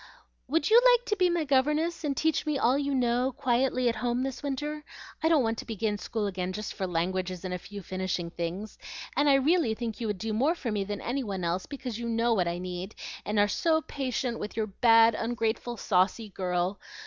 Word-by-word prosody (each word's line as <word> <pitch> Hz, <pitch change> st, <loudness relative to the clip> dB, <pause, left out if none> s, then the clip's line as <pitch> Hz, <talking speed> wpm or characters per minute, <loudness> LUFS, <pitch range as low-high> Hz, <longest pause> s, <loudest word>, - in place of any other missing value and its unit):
"Would 315 Hz, +7 st, +1 dB
you 470 Hz, +2 st, +8 dB
like -, -, +5 dB
to 420 Hz, -, 0 dB
be 365 Hz, -3 st, +3 dB
my 345 Hz, -2 st, +1 dB
governess 300 Hz, +5 st, +1 dB
and 285 Hz, -2 st, -1 dB
teach 320 Hz, -2 st, +1 dB
me 300 Hz, -2 st, +1 dB
all 255 Hz, 0 st, +3 dB
you 280 Hz, 0 st, 0 dB
know, 250 Hz, +1 st, +1 dB
quietly, 255 Hz, 0 st, +1 dB
at 230 Hz, -, +1 dB
home 245 Hz, +1 st, 0 dB
this 265 Hz, -2 st, -4 dB
winter? 295 Hz, +2 st, -3 dB, 0.4 s
I 320 Hz, -, +3 dB
don't 310 Hz, -5 st, +4 dB
want 225 Hz, 0 st, -1 dB
to -, -, -6 dB
begin 215 Hz, -2 st, -2 dB
school 220 Hz, 0 st, -2 dB
again 185 Hz, -2 st, -3 dB
just 215 Hz, +2 st, -5 dB
for 190 Hz, -, -3 dB
languages 185 Hz, +1 st, -2 dB
and 185 Hz, -, -3 dB
a 180 Hz, -, -3 dB
few 200 Hz, +2 st, -9 dB
finishing 185 Hz, -2 st, -3 dB
things, 175 Hz, +5 st, -5 dB, 0.4 s
and 290 Hz, 0 st, +3 dB
I 275 Hz, -, +6 dB
really 275 Hz, -4 st, +3 dB
think 230 Hz, 0 st, -5 dB
you 230 Hz, -, -1 dB
would 210 Hz, -2 st, -2 dB
do 220 Hz, +3 st, -3 dB
more 275 Hz, +10 st, +2 dB
for 250 Hz, -9 st, -4 dB
me 205 Hz, -2 st, 0 dB
than 205 Hz, +1 st, -5 dB
any 265 Hz, +3 st, -2 dB
one 195 Hz, -5 st, -4 dB
else, 175 Hz, +2 st, -1 dB
because 260 Hz, -5 st, -5 dB
you 235 Hz, 0 st, -3 dB
know 230 Hz, +1 st, +2 dB
what 180 Hz, -5 st, +1 dB
I 170 Hz, 0 st, -1 dB
need, 180 Hz, +2 st, -5 dB, 0.3 s
and 210 Hz, +1 st, -1 dB
are 205 Hz, 0 st, +5 dB
so 315 Hz, +8 st, +1 dB
patient 255 Hz, -3 st, -2 dB
with 210 Hz, -, -6 dB
your 220 Hz, -, +1 dB
bad, 225 Hz, +2 st, +5 dB
ungrateful, 230 Hz, +1 st, -2 dB
saucy 200 Hz, +3 st, +1 dB
girl. 180 Hz, 0 st, -1 dB
230 Hz, 220 wpm, -28 LUFS, 195-275 Hz, 0.4 s, you